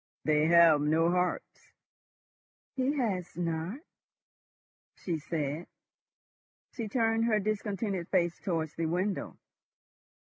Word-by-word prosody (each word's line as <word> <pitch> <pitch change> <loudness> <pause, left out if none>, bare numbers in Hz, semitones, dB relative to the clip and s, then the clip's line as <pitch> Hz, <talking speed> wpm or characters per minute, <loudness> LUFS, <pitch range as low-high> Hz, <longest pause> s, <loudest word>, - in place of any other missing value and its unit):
"They 155 0 +3
have 170 -3 +6
no 160 +3 +2
hearts." 180 0 -2 1.0
"He 270 +2 0
has 190 -10 -2
not," 170 - -3 1.1
she 170 -4 -3
said. 150 +1 -3 1.0
She 230 -3 -5
turned 225 0 +1
her 220 -2 +2
discontented 200 -3 -2
face 175 -2 +1
towards 165 -5 -2
the 165 -1 -2
window. 185 +4 -2
180 Hz, 100 wpm, -30 LUFS, 165-210 Hz, 1.1 s, have